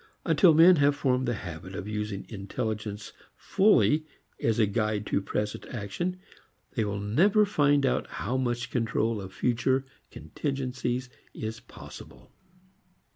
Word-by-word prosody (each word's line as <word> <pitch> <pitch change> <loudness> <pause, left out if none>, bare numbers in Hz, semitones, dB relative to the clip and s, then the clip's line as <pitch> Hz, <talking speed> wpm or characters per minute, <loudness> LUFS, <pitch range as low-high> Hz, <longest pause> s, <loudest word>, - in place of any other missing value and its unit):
Until 165 0 +5
men 170 +3 +8
have 145 0 +3
formed 130 -2 0
the 120 - 0
habit 95 0 -8
of 95 - -5
using 105 -2 -4
intelligence 105 0 -5 0.2
fully 160 -6 +3 0.3
as 115 -2 +1
a 110 - +4
guide 105 0 -1
to 100 - 0
present 105 +1 -3
action 125 - -4 0.5
they 115 - -1
will 105 -1 -3
never 185 - +3
find 145 -7 +2
out - - 0
how 120 +6 -4
much 120 -2 -1
control 115 -2 0
of 95 -1 -8
future 130 +5 0 0.2
contingencies 125 - -3 0.2
is 110 +1 -5
possible. - - -13
120 Hz, 130 wpm, -28 LUFS, 105-140 Hz, 0.5 s, men